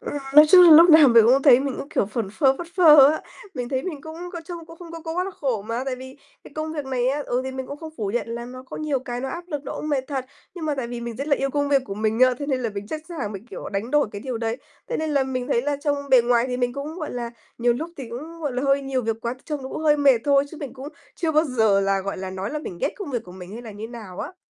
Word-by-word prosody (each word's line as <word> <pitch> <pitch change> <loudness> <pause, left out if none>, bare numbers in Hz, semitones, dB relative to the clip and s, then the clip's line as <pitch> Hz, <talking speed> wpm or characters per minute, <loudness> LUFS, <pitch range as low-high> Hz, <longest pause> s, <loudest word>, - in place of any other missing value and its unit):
Ừ. - - -6 0.2
Nói 300 +1 +10
chung 360 +3 +9
là 345 - +8
lúc 330 +3 +9
nào 310 -3 +8
mình 230 -2 +7
cũng 265 +3 +4
thấy 265 -3 +7
mình 275 -1 -3
cũng, 280 - -6
kiểu, 205 - 0
phẩn 215 0 -3
phơ 265 +4 +3
phất 345 - -6
phơ 300 -6 +8
á. 315 - -3 0.3
Mình 245 -3 -4
thấy 260 0 -1
mình 315 -7 -5
cũng 315 0 -8 0.2
có 340 - -5
trông 335 -1 -8
cũng 330 0 -13
không 340 -2 -11
có 330 - -7
có 325 0 -5
quá 360 +1 0
là 390 - -4
khổ 260 - -2
mà, 230 +4 -3
tại 265 -2 -3
vì 260 +1 -11 0.3
cái - - -13
công 310 0 -4
việc 295 -3 -4
này 255 -2 0
á, 290 +2 -1
ừ, 245 - 0
thì 265 - -3
mình 260 0 -5
cũng 285 - -7
không 315 +1 -9
phủ 205 -3 -2
nhận 240 - -1
là 235 +1 -5
nó 255 +1 -9
có 260 - -9
nhiều 300 -3 -1
cái 245 -1 -5
nó 265 - -3
áp 345 +3 -6
lực, 295 -5 -4
nó - - -5
cũng 305 - -5
mệt 275 -3 0
thật. 270 -3 -3 0.3
Nhưng 345 -3 -6
mà 300 -2 0
tại 265 -4 -3
vì 240 0 -6
mình 235 -1 -6
rất 275 - -4
là 280 - +3
yêu 275 0 -1
công 285 0 0
việc 275 -2 +3
của 195 -6 -6
mình 220 +2 -1
á, 255 0 +6
thế 285 - -4
nên 265 -3 0
là 230 - -1
mình 200 +1 -6
sẵn 310 - -4
sàng 275 -12 -4
mình, 200 +3 -9
kiểu, - - -8
đánh 205 +4 -3
đổi 295 -4 +2
cái 200 - -6
điều 250 0 -4
đấy. 225 0 -2 0.3
Thế - - -1
nên 315 -1 -2
là 280 -2 +2
mình 255 -1 -3
thấy 235 - +1
là 290 +1 -1
trông 285 0 -1
bề 255 -2 +7
ngoài 240 0 +2
thì 250 - -2
mình 245 -1 0
cũng, 280 +4 -6
gọi 310 - -4
là, 240 -1 -4 0.3
nhiều 240 0 +3
lúc 315 +8 -5
thì 265 -4 -7
cũng, 310 +8 -8
gọi 290 -4 -2
là, 250 +1 -2
hơi 275 0 +2
nhiều 270 -2 -2
việc 225 -1 -1
quá 235 +1 -3
thì 255 - -23
trông 300 -3 -4
nó 260 - -6
cũng - - -5
hơi 300 -1 +4
mệt 275 -4 +5
thôi, 280 -1 +4
chứ 325 - -10
mình 280 -4 -6
cũng 270 +2 -8 0.3
chưa 325 -2 -1
bao 310 +1 +4
giờ 220 -8 +2
là, 195 0 +1
gọi 200 +1 -4
là, 190 0 -5
nói 190 +1 -4
là 300 - -3
mình 185 - -8
ghét - - 0
công 400 -8 -6
việc 240 -4 -2
của 180 - -12
mình 185 0 -10
hay 235 +3 -8
là 230 - -9
như 210 +2 -8
nào 215 -6 -10
á. 370 - -7
265 Hz, 335 wpm, -23 LUFS, 235-300 Hz, 0.3 s, Nói